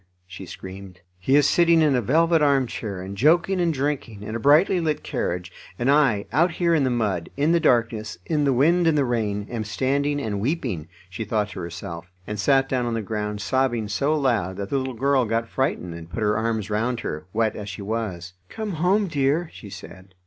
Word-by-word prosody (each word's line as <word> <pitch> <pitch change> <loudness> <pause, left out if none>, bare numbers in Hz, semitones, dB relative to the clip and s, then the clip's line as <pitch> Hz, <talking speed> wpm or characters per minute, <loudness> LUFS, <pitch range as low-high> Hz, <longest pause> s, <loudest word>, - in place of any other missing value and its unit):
she 95 0 -10
screamed. 95 0 -10 0.2
"He 130 +10 +2
is 145 -1 +5
sitting 170 -2 +4
in 150 -3 +3
a 125 - +2
velvet 165 +7 +3
arm 140 -3 +3
chair 100 -5 -5
and 95 +1 -7
joking 170 - +3
and 170 -1 +2
drinking, 135 -7 -3
in 110 +2 -5
a - - -2
brightly 155 - +4
lit 155 -3 -1
carriage, 90 +1 -3 0.3
and 125 +3 +2
I, 135 -9 +3
out 170 +2 +2
here 170 -1 +1
in 155 -4 +3
the 130 - +2
mud, 105 -8 -1
in 145 +3 +2
the 170 - +4
darkness, 115 - +1
in 150 -2 0
the 140 - +3
wind 165 +7 +3
and 160 -2 +3
the 140 - +3
rain, 105 -4 -1
am 115 -2 -2
standing 140 +7 0
and 105 -7 -3
weeping," 115 - -2 0.2
she 95 +5 -5
thought 105 -1 -1
to - - -7
herself; 85 0 -7
and 105 -1 -5
sat 135 +4 +3
down 125 -2 -1
on 115 - -1
the 115 - -2
ground, 105 0 -3
sobbing 120 -1 0
so 140 +10 0
loud 110 - 0
that 100 0 -5
the 140 - +2
little 130 -1 -4
girl 135 +2 +2
got 115 +1 -1
frightened, 100 -11 -2
and 85 0 -9
put 100 +6 -3
her 105 0 +2
arms 110 -2 -1
round 115 +3 -1
her, 75 +3 -5
wet 110 +1 0
as 105 -1 -6
she 100 +1 -7
was. 100 -5 -4 0.2
"Come 220 -2 -4
home, 185 +5 +2
dear," 155 +2 0
she 105 - -11
said. 95 -1 -12
115 Hz, 215 wpm, -24 LUFS, 100-145 Hz, 0.3 s, is